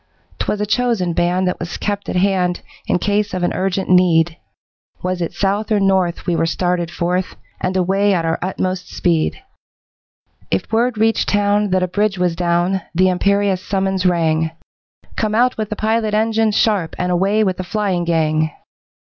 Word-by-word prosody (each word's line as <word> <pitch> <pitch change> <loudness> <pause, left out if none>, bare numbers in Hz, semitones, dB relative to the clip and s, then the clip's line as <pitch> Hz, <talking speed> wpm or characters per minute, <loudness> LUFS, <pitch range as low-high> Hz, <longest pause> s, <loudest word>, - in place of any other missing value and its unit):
'Twas 210 - -1
a 210 - 0
chosen 220 -5 0
band 180 +2 +1
that 180 - -2
was 170 0 -5
kept 205 -1 -3
at - - -3
hand 180 -1 +1 0.3
In - - +2
case 205 +1 0
of 180 - -2
an 175 - +1
urgent 190 0 -1
need, 175 -2 +4 0.7
Was 180 0 -2
it 170 - -2
south 205 +2 -1
or 210 - +3
north 190 -3 +1
we 175 - 0
were 165 - +1
started 175 0 -1
forth, 180 +2 -2 0.2
And 185 +1 -1
away 195 +3 +2
at 165 -2 -1
our 165 0 0
utmost 185 0 -3
speed. 170 - 0 1.1
If - - -2
word 235 +1 +1
reached 225 +1 +2
town 205 0 +2
that 185 0 +1
a - - +1
bridge 205 +2 0
was 180 -2 0
down, 175 +2 +1
The 185 +2 +4
imperious 200 +1 +1
summons 190 -1 -1
rang 160 -3 +2 0.7
'Come 215 -1 -1
out 250 +2 +3
with 215 -2 -3
the 215 - -3
pilot 220 0 0
engine 220 0 +2
sharp, 205 -5 +1
And 180 0 -1
away 195 +5 +2
with 185 -3 0
the 185 - -3
flying 185 -1 -1
gang.' 155 -2 +1
185 Hz, 175 wpm, -18 LUFS, 175-205 Hz, 1.1 s, need